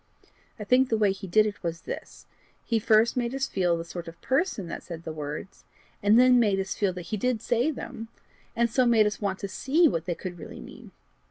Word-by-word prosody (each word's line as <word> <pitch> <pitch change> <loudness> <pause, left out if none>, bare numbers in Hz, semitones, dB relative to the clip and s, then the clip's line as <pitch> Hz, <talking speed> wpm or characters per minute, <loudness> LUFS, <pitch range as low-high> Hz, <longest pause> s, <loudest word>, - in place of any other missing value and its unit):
I 215 - -6
think 255 +4 +3
the 225 - +2
way 210 -2 +3
he 195 0 -7
did 215 +4 +4
it 205 -4 -4
was 165 -1 -4
this: - - -8 0.4
he 230 -2 +1
first 220 +2 +3
made 245 0 -1
us 270 0 0
feel 175 -3 +1
the 165 - -5
sort 170 0 -7
of 165 0 -10
person 265 - 0
that 170 - -6
said 170 -2 -8
the 160 - -5
words, 150 +5 -7 0.4
and 210 +3 +5
then 250 0 +6
made 205 -4 +2
us 190 0 -2
feel 200 -3 0
that 180 -1 -7
he - - +1
did 250 +2 0
say 240 +5 +1
them, 245 -5 -6 0.5
and 235 0 +3
so 245 +2 +2
made 225 -2 +5
us 210 +1 -2
want 195 -2 -1
to 200 - -3
see 290 - +2
what 165 - -1
they 175 - -2
could 175 -1 -7
really - - -9
mean. - - -12
210 Hz, 235 wpm, -27 LUFS, 180-240 Hz, 0.5 s, then